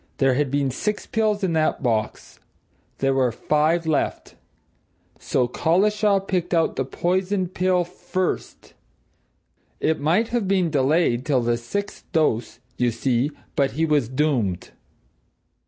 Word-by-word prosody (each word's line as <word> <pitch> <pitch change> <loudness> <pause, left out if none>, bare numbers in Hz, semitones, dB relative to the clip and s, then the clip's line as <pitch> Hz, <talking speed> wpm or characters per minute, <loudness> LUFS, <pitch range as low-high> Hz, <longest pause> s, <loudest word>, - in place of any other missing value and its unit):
There 135 -1 +3
had 140 +1 0
been 140 0 0
six 210 - -2
pills 215 -2 0
in 180 -3 +1
that 155 -3 0
box 110 -4 -2 0.6
there 135 0 +1
were 130 -2 +2
five 155 +7 +1
left. 155 -2 -1 0.9
So 125 -2 0
Collishaw 200 - +2
picked 180 -2 -1
out 165 -1 +1
the 135 - -1
poisoned 185 +5 -1
pill 185 -1 +2
first! 185 +1 -4 1.1
It 160 - +1
might 175 +10 +1
have 230 -4 -1
been 185 -4 +1
delayed 140 -3 +2
till 135 -3 +1
the 120 0 +1
sixth 200 +13 -5
dose, 120 -9 +1 0.2
you 125 -1 +2
see 120 +3 0 0.3
but 140 -1 +1
he 160 +3 +1
was 145 -7 +1
doomed." 130 - -1
155 Hz, 135 wpm, -23 LUFS, 130-185 Hz, 1.1 s, There